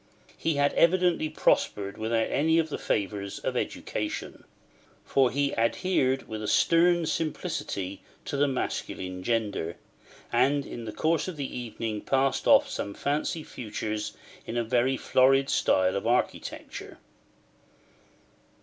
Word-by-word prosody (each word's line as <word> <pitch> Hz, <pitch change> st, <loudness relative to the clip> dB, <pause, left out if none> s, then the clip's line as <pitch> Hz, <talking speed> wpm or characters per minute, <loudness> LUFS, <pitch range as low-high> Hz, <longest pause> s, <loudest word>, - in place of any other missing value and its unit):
He 165 Hz, -2 st, -1 dB
had 145 Hz, 0 st, +2 dB
evidently 170 Hz, -2 st, +3 dB
prospered 100 Hz, -9 st, +1 dB
without 115 Hz, +1 st, 0 dB
any 160 Hz, +3 st, +3 dB
of 160 Hz, -1 st, +2 dB
the -, -, -4 dB
favours 100 Hz, -1 st, -2 dB
of -, -, -3 dB
education; -, -, -4 dB, 0.6 s
for 135 Hz, -2 st, +3 dB
he 140 Hz, +2 st, 0 dB
adhered 130 Hz, +2 st, +1 dB
with 110 Hz, -1 st, -4 dB
stern 170 Hz, 0 st, +4 dB
simplicity 100 Hz, -, -3 dB, 0.2 s
to -, -, -3 dB
the 145 Hz, +1 st, +3 dB
masculine 95 Hz, -8 st, -3 dB
gender, 100 Hz, -6 st, -1 dB, 0.6 s
and 140 Hz, 0 st, +3 dB
in 120 Hz, -, -7 dB
the 110 Hz, -, -4 dB
course 160 Hz, -, 0 dB
of 180 Hz, -4 st, -5 dB
the 140 Hz, -2 st, -4 dB
evening 115 Hz, -3 st, -4 dB
passed 135 Hz, 0 st, +1 dB
off -, -, +6 dB
some 100 Hz, -, -4 dB
fancy 150 Hz, +3 st, -1 dB
futures 105 Hz, -3 st, -4 dB, 0.3 s
in 120 Hz, -, -3 dB
a 120 Hz, -, +1 dB
very 125 Hz, +3 st, +1 dB
florid 135 Hz, +2 st, +3 dB
style 95 Hz, 0 st, +2 dB
of 100 Hz, -, -2 dB
architecture. 120 Hz, +1 st, -2 dB
130 Hz, 130 wpm, -28 LUFS, 110-150 Hz, 0.6 s, off